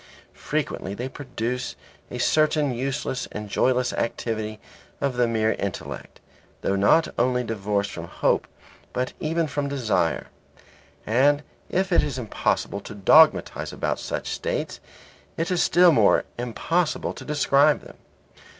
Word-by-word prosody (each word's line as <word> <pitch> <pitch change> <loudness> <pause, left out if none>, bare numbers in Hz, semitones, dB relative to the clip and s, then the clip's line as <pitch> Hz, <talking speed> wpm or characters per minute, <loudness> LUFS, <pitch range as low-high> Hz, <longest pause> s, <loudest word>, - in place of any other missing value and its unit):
Frequently 95 - -3
they 125 +4 -4
produce 125 -2 -4 0.3
a - - -6
certain 155 -3 +2
useless 130 +1 -2
and 105 0 -6
joyless 125 +4 +1
activity 110 -2 -3 0.4
of 140 -3 -1
the 120 -1 +3
mere 110 -1 +1
intellect, 100 -3 -5 0.4
thought 95 - +1
not 160 +11 +4
only 125 +1 +2
divorced 105 -3 -1
from 85 0 -7
hope - - 0 0.5
but 125 0 -2
even 165 +1 0
from 145 -1 -2
desire. 110 - 0 0.8
And 140 +6 +3 0.3
if 190 +1 0
it 175 - +5
is 145 -3 -3
impossible 110 -3 -1
to 105 - -10
dogmatize 155 +11 +4
about - - -2
such - - -4
states, - - -3 0.6
it 165 +3 -1
is 180 - +2
still 175 0 +6
more 150 - +4
impossible 155 +8 -1
to - - -10
describe 150 0 +3
them. - - -14
125 Hz, 130 wpm, -24 LUFS, 110-150 Hz, 0.8 s, still